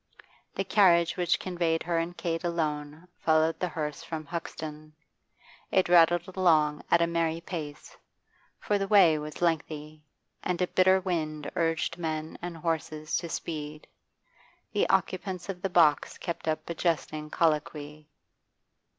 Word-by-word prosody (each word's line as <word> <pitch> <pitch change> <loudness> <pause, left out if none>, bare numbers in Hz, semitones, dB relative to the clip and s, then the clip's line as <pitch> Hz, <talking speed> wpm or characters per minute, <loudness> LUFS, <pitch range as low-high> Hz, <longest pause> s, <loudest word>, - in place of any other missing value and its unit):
The 195 - 0
carriage 175 -4 +4
which 175 -1 +1
conveyed 170 -3 -1
her 170 0 0
and 170 +1 -4
Kate 165 -1 -2
alone 155 -1 -3
followed 160 0 +2
the 180 - 0
hearse 150 -3 -4
from 155 -2 -5
Hoxton; 155 -1 -6 0.8
it 190 - +3
rattled 175 0 +5
along 155 -5 +3
at 170 0 +5
a - - +4
merry 165 -1 0
pace, 155 -4 -7 0.6
for 205 -1 0
the 195 - -1
way 185 -7 +6
was 150 +3 -6
lengthy, 155 -2 -2 0.4
and 180 -2 -2
a 180 - +3
bitter 185 +1 +4
wind 155 -5 -3
urged 165 0 0
men 155 -1 -3
and 175 -1 -5
horses 155 -1 -2
to 170 - -4
speed. 155 -2 -5 0.9
The - - +1
occupants 190 -1 -1
of 180 -2 -5
the 195 - -1
box 165 -5 +3
kept 170 -3 -5
up 155 0 -1
a 170 - -3
jesting 155 -2 -1
colloquy. 150 -1 -1
165 Hz, 140 wpm, -28 LUFS, 155-175 Hz, 0.9 s, way